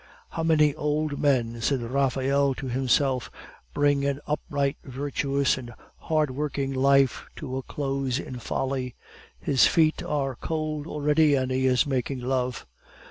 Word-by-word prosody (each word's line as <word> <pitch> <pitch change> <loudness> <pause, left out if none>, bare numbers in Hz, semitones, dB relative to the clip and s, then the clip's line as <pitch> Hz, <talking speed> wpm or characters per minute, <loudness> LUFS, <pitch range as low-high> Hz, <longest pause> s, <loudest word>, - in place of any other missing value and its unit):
"How 165 - -4
many 155 -2 +4
old 150 0 -1
men," 120 -5 +1
said 135 +3 +1
Raphael 135 +2 +1
to 135 - -6
himself, 130 +1 +1 0.4
"bring 145 -1 +2
an 140 0 0
upright, 145 -1 -1
virtuous, 140 0 0
and 120 -2 -10 0.2
hard 155 -3 0
working 140 0 -2
life 135 0 +3
to 130 -3 -5
a - - -2
close 135 -1 -2
in 130 -3 -6
folly! 130 +1 -3 0.4
His 135 -3 +4
feet 160 -1 +2
are 140 -3 -1
cold 155 +1 -3
already, 150 -1 +3
and 130 -1 0
he 130 0 +1
is 125 -2 +3
making 135 -1 -2
love." 125 -1 -1
140 Hz, 140 wpm, -26 LUFS, 130-145 Hz, 0.4 s, many